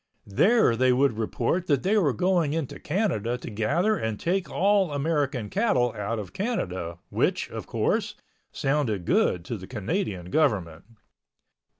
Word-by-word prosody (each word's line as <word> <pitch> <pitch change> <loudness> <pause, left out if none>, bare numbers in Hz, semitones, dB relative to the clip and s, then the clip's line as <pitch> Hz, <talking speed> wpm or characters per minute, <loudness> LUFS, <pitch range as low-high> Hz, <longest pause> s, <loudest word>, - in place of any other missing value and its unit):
There 185 - +3
they 130 +2 +3
would 125 -3 +2
report 120 +11 -1
that 140 -4 +2
they 200 +3 +2
were 175 -10 +3
going 170 - +1
into 160 -5 -3
Canada 145 - -1
to 125 - -8
gather 170 - +1
and 110 -2 -3
take 185 +2 -1
all 195 -2 +2
American 145 -5 -1
cattle 130 - +1
out 105 +3 -3
of 100 -4 -7
Canada 95 - -3
which, - - 0
of - - -6
course, - - 0 0.4
sounded 130 - -1
good 85 -1 +2
to 115 - -4
the 95 -1 -10
Canadian 105 - -3
government. 95 - 0
130 Hz, 150 wpm, -26 LUFS, 105-175 Hz, 0.4 s, There